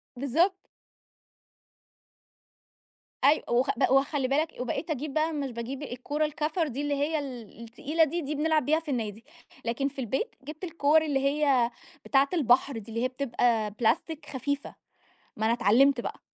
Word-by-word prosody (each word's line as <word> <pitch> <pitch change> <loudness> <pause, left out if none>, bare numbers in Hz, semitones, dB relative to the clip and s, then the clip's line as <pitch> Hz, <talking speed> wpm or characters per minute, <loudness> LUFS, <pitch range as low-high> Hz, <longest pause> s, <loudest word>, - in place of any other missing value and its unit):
بالضبط. 280 +9 +2 2.7
أيو 290 +3 +5
وخ 245 +3 +2
ب - - 0
وخّلِ 270 0 +2
بالك 305 +4 0
وبقيت 255 +7 -3
أجيب 295 -1 -3
بقى 315 +1 +1
مش 280 -3 -3
باجيب 245 +4 -5
الكورة 290 +4 -2
الكَفر 305 +2 -1
دي 275 +2 -4
اللي 290 0 -1
هي 300 +3 0
ال 245 -6 -8
التقيلة 275 +8 0
دي، 335 +3 -1
دي 300 0 -3
بنلعب 310 -1 +1
بيها 310 +3 +3
في 320 -3 -6
النادي، 225 -2 -3 0.4
لكن 240 +4 0
في 280 -1 -8
البيت 265 - -2
جبت 305 +5 -9
الكور 315 -2 +3
اللي 295 -3 0
هي 275 -3 +2 0.3
بتاعة 275 0 +3
البحر 265 -4 +3
دي 220 0 -9
اللي 230 +2 -2
هي - - +3
بتبقى 240 -4 0
بلاستيك 245 +8 0
خفيفة، 285 +2 -3 0.6
ما 220 - 0
أنا 225 - +3
اتعلّمت 240 +4 +4
بقى. - - -6
275 Hz, 160 wpm, -28 LUFS, 245-305 Hz, 2.7 s, أيو